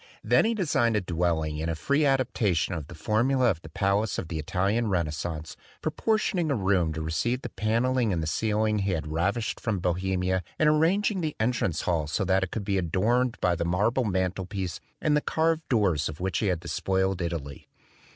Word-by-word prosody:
Then - - +4
he 230 +1 +1
designed 140 - +1
a 105 - +2
dwelling 85 -3 -1
in 80 +2 -2
a 80 - -1
free 140 - +1
adaptation 115 -10 +1
of 80 -4 -5
the 85 - -10
formula 120 - +2
of 80 - -5
the 80 - -11
palace 100 +6 0
of 80 - -4
the 80 - -3
Italian 95 +8 0
Renas 85 -6 0
cence, 80 0 -5 0.3
proportioning 205 -6 0
a 140 - +2
room 95 -6 +1
to 80 0 -4
receive 120 +11 -1
the - - -4
panelling 115 +3 +1
and 85 -3 -1
the - - -2
ceiling 110 +5 +1
he 100 -1 0
had 80 -3 -2
ravished 100 +8 -1
from 110 -4 -1
Bohemia 90 +1 0 0.2
and 155 - +3
arranging 180 +6 +2
the 155 -2 -2
entrance 110 -8 0
hall 80 -4 0
so 95 +6 -1
that 95 +1 +2
it 95 - -2
could 100 +1 -4
be 100 -2 +1
adorned 115 +8 +1
by 90 -1 +2
the 85 - -2
marble 105 +9 +1
mantel 95 -2 -1
piece 95 -3 -4 0.2
and 150 -1 +2
the 150 - +2
carved 160 +1 0
doors 95 - +2
of 75 - -8
which 95 +1 -1
he 105 - 0
had 90 -3 0
despoiled 95 +1 -1
Italy. 80 -5 -5
95 Hz, 200 wpm, -27 LUFS, 85-120 Hz, 0.3 s, Then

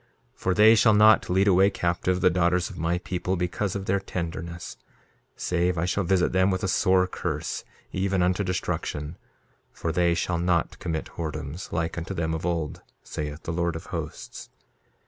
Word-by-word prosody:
2:33 - - -33
For 95 - +1
they 110 +2 +7
shall 110 0 +5
not 110 0 +6
lead 95 +3 +3
away 95 +1 +5
captive 90 0 -1
the 90 - +5
daughters 90 +2 +1
of 95 - -11
my 85 +2 0
people 90 +1 -2
because 90 +2 -2
of 100 -1 -3
their 100 +1 +1
tenderness, 85 -2 -5 0.6
save 90 0 0
I 80 - 0
shall 95 +2 0
visit 90 0 +2
them 95 +1 +3
with 95 -1 -1
a - - +1
sore 95 0 +3
curse, 90 - -4 0.3
even 95 -1 0
unto 90 +3 +1
destruction; 80 -4 -3 0.6
for 80 - -3
they 85 +1 +2
shall 85 0 -1
not 85 -1 0
commit 80 -2 -4
whoredoms, 80 0 -5
like 80 0 -2
unto 95 +4 -5
them 80 -1 -1
of 80 +2 -3
old, 80 -4 -2 0.2
saith 75 +1 -5
the 85 - -3
Lord 85 0 0
of 80 +2 -7
Hosts. 80 -2 -6
90 Hz, 180 wpm, -26 LUFS, 85-95 Hz, 0.6 s, they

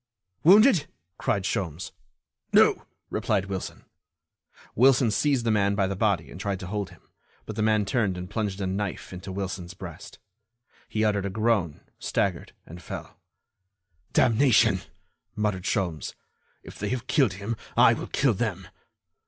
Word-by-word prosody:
"Wounded?" 200 - +6 0.3
cried 100 - 0
Sholmes. 95 -4 -3 0.6
"No," - - +4 0.2
replied 95 - 0
Wilson. 95 -2 -6 0.9
Wilson 125 -1 +4
seized 130 +3 +1
the 115 - +2
man 100 -1 +2
by 100 -1 +2
the 100 +1 -2
body 95 -5 0
and 90 - -8
tried 100 -2 -2
to - - -5
hold 100 +1 -3
him, - - -19 0.4
but 110 - -6
the 110 - -2
man 110 -1 +2
turned 100 -4 0
and 90 0 -6
plunged 105 -1 -3
a - - -1
knife 95 0 -3
into 90 +2 -7
Wilson's 95 -1 -5
breast. - - -10 0.7
He 110 0 0
uttered 100 -2 +1
a - - -3
groan, 100 -6 0 0.2
staggered - - -1
and 85 +2 -11
fell. - - -8 0.9
"Damnation!" 115 -5 +4 0.5
muttered 105 -3 -1
Sholmes, 85 - -2 0.5
"if - - -12
they 105 - -2
have 125 -2 -3
killed 135 - +2
him 100 +5 -4 0.2
I - - +7
will - - -5
kill 135 -4 +2
them." 95 -4 -3
100 Hz, 150 wpm, -26 LUFS, 95-115 Hz, 0.9 s, I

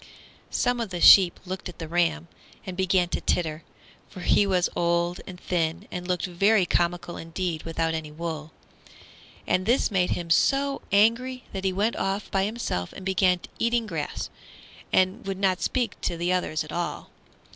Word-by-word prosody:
Some 245 0 0
of 230 -3 -2
the 180 -2 -4
sheep 180 0 +8
looked 185 0 -5
at 175 - -12
the 165 - -6
ram 165 -1 0 0.4
and 185 -2 -6
began 185 -1 +2
to - - -2
titter, 160 -2 -1 0.5
for 185 - -10
he 200 +3 +3
was 180 -2 +2
old 170 +1 0
and 180 -2 -9
thin, 170 +2 -2
and 180 0 -5
looked 180 -2 0
very 195 +2 +3
comical 175 0 -1
indeed 165 -1 -3
without 165 0 -2
any 160 -2 -4
wool. 160 -1 -5 0.9
And 185 +2 0
this 240 0 +2
made 185 -3 +2
him 170 -1 -3
so 275 +10 +2
angry 230 +5 +2
that 195 -1 -4
he 190 - +2
went 205 +5 0
off 195 +2 -2
by 195 0 +2
himself 210 - -3
and 190 - -10
began 185 -1 +2 0.2
eating 235 0 +1
grass, 210 - -4 0.6
and 185 +2 +2
would 195 -1 -2
not 190 -2 +1
speak 245 -6 -1
to 170 - -2
the 175 +2 0
others 160 -3 -1
at 155 - -10
all. 175 +1 -4
180 Hz, 175 wpm, -26 LUFS, 170-195 Hz, 0.9 s, sheep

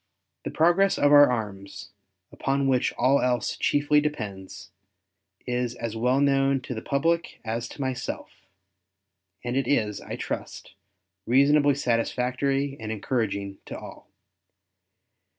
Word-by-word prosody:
The - - -2
progress 175 +4 +3
of 145 - +3
our 145 0 +8
arms, 100 -5 -5 0.4
upon 135 0 -1
which 130 -2 +2
all 135 +3 +3
else 125 -2 0
chiefly 145 +1 +2
depends, 100 - -6 0.7
is 125 -1 -2
as 115 -2 -5
well 125 +4 +1
known 135 -1 +2
to 125 - -6
the 110 - -5
public 165 +4 -1
as 115 +1 -3
to - - -9
myself; 130 -2 -4 1.1
and 120 0 -3
it 135 -2 0
is, 105 -7 0
I - - -6
trust, - - -6 0.5
reasonably 140 +3 +4
satisfactory 130 +2 0
and 110 -1 -5
encouraging 100 -3 -2
to - - -6
all. - - -12
125 Hz, 125 wpm, -26 LUFS, 115-140 Hz, 1.1 s, our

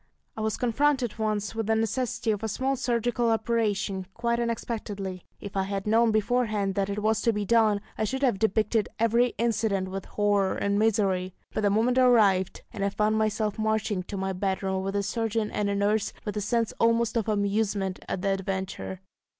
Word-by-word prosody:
I 220 - -5
was 220 -1 -1
confronted 250 -1 +1
once 215 -1 -1
with 225 -1 -3
the 220 - +3
necessity 235 +1 0
of 210 - -2
a 220 - -2
small 265 +5 -1
surgical 240 -1 0
operation, 215 -4 0
quite 235 0 0
unexpectedly. 210 -5 -3 0.2
If 200 - -8
I 195 - +2
had 195 0 -3
known 225 +2 +4
beforehand 215 -2 +1
that 195 +1 -1
it 205 +1 -3
was 220 0 +2
to 230 - +3
be 210 -2 -2
done, 215 -1 +3 0.2
I 215 - +2
should 265 +6 -3
have 240 -8 +2
depicted 220 0 +1
every 235 +2 +2
incident 220 -5 0
with 195 0 -5
horror 205 -2 +1
and 200 0 0
misery. 195 -4 +1 0.2
But - - -1
the 205 - +3
moment 230 +5 +2
arrived, 210 -7 +4
and 200 - -3
I 200 - +2
found 215 +2 +1
myself 215 0 0
marching 220 -2 0
to 200 - -6
my 190 0 -2
bedroom 190 0 -1
with 195 +1 -3
a 200 - +1
surgeon 225 0 -1
and 205 -1 -1
a 200 - 0
nurse, 205 +1 +1
with 210 - -3
a 210 - -1
sense 230 +2 0
almost 230 0 +2
of 225 -2 0
amusement 200 -2 0
at 180 - -3
the 200 - +1
adventure. 190 -1 -3
215 Hz, 190 wpm, -27 LUFS, 200-230 Hz, 0.2 s, known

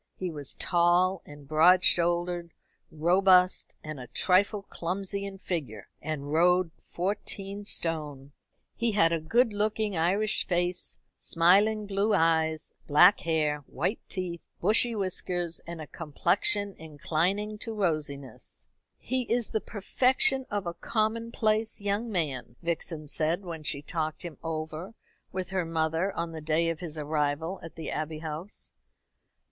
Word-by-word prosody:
He 185 -2 -4
was 145 -3 -8
tall 175 +2 +2
and 145 -1 -12
broad 175 +5 +5
shouldered, 175 0 +1 0.4
robust, 180 +3 +4
and 155 -2 -5
a 125 - -8
trifle 200 - +2
clumsy 195 +2 -4
in 195 -1 -7
figure, 145 - -5
and 145 -2 -4
rode 180 +1 +4
fourteen 200 +2 -4
stone. 150 -7 -3 0.4
He 235 -2 0
had 165 -5 +4
a 165 - +1
good 225 +9 +2
looking 210 0 0
Irish 195 +6 +1
face, 175 0 -1 0.2
smiling 205 +6 +3
blue 205 +1 +1
eyes, 160 -2 +1 0.2
black 175 +7 +7
hair, 155 -3 0
white 175 - -2
teeth, 180 -3 -4 0.2
bushy 225 +5 +4
whiskers, 180 -3 -2
and 170 -1 -6
a 155 - -6
complexion 185 +6 +1
inclining 170 +7 -1
to 225 - -4
rosiness. 155 - -3 0.3
"He 255 -1 -3
is 235 -1 +1
the 220 - 0
perfection 260 - +3
of 205 -2 -2
a 170 - -3
commonplace 220 +1 0
young 205 +3 -2
man," 140 - -2
Vixen 165 -2 -2
said, 160 +5 0
when 165 -3 -6
she 145 -1 -3
talked 155 -1 -3
him 170 -5 -8
over 160 +5 -5 0.4
with 185 -1 -4
her 185 -2 0
mother 165 +3 0
on 170 0 -3
the 160 -1 -7
day 160 +2 +1
of 165 - -6
his 165 -3 -6
arrival 150 +3 -1
at 165 - -10
the 165 - -5
Abbey 155 0 -3
House. 160 +5 -7
175 Hz, 140 wpm, -28 LUFS, 160-200 Hz, 0.4 s, black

